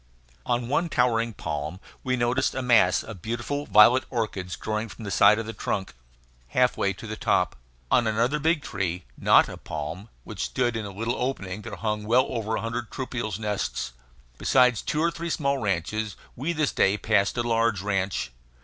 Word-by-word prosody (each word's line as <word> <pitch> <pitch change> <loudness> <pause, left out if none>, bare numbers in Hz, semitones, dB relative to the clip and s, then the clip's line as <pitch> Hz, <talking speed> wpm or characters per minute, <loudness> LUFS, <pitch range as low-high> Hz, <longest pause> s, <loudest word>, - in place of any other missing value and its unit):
On 120 -1 0
one 165 +6 +1
towering 115 -3 +2
palm 75 -2 -4 0.2
we 130 0 +1
noticed 120 +3 +1
a 130 - -2
mass 100 -9 +4
of 110 -6 -9
beautiful 120 - -3
violet 105 +5 +7
orchids 100 -7 -3
growing 110 +1 -3
from 110 - -10
the 100 - -4
side 105 +3 +6
of 115 - -3
the 115 - -5
trunk, 95 -4 -3 0.5
half 125 - +2
way 100 - +1
to 100 +4 -9
the 110 0 -4
top. - - +1 0.4
On 120 - +4
another 115 +7 +1
big 160 0 +1
tree, 90 -6 -3
not - - +5
a - - -8
palm, 80 +8 -6
which - - -4
stood 120 -2 0
in 110 -2 -3
a - - -7
little 115 +5 -3
opening, 105 -7 -3
there 110 -2 -7
hung 105 +2 -2
well 125 +4 +4
over 110 -2 -2
a - - -2
hundred 115 0 -4
troupials' 115 -7 -4
nests. 105 - -3 0.5
Besides 125 -4 +4
two 150 - -1
or 170 - +2
three 170 0 -5
small 140 -3 0
ranches 105 +1 -2 0.2
we 145 +8 -2
this 155 -3 0
day 95 +2 +2
passed 105 +1 +1
a 120 - +1
large 115 -4 +1
ranch. 95 -9 -1
115 Hz, 185 wpm, -26 LUFS, 100-125 Hz, 0.5 s, violet